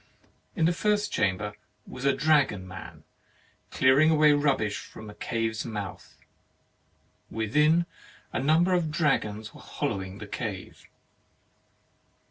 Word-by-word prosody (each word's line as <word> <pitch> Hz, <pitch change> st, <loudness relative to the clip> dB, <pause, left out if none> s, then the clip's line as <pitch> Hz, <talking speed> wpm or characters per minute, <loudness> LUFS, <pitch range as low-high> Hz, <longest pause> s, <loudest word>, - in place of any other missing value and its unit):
In 165 Hz, -, +2 dB
the 170 Hz, -, +3 dB
first 205 Hz, +3 st, 0 dB
chamber 105 Hz, +1 st, 0 dB, 0.3 s
was 125 Hz, +2 st, -8 dB
a 140 Hz, -, +5 dB
dragon 135 Hz, -10 st, +2 dB
man, 95 Hz, 0 st, -10 dB, 0.7 s
clearing 135 Hz, +4 st, +4 dB
away 155 Hz, -1 st, +5 dB
the 145 Hz, -, +4 dB
rubbish 135 Hz, -8 st, +1 dB
from 110 Hz, -1 st, -10 dB
a -, -, -12 dB
cave's 115 Hz, 0 st, -2 dB
mouth; 105 Hz, -6 st, -7 dB, 1.1 s
within, 150 Hz, +10 st, +2 dB, 0.5 s
a -, -, 0 dB
number 160 Hz, +7 st, +3 dB
of 175 Hz, -3 st, +1 dB
dragons 110 Hz, -9 st, 0 dB
were -, -, -13 dB
hollowing 95 Hz, 0 st, -4 dB
the 105 Hz, -, -8 dB
cave. 100 Hz, -2 st, -6 dB
130 Hz, 120 wpm, -27 LUFS, 105-155 Hz, 1.1 s, a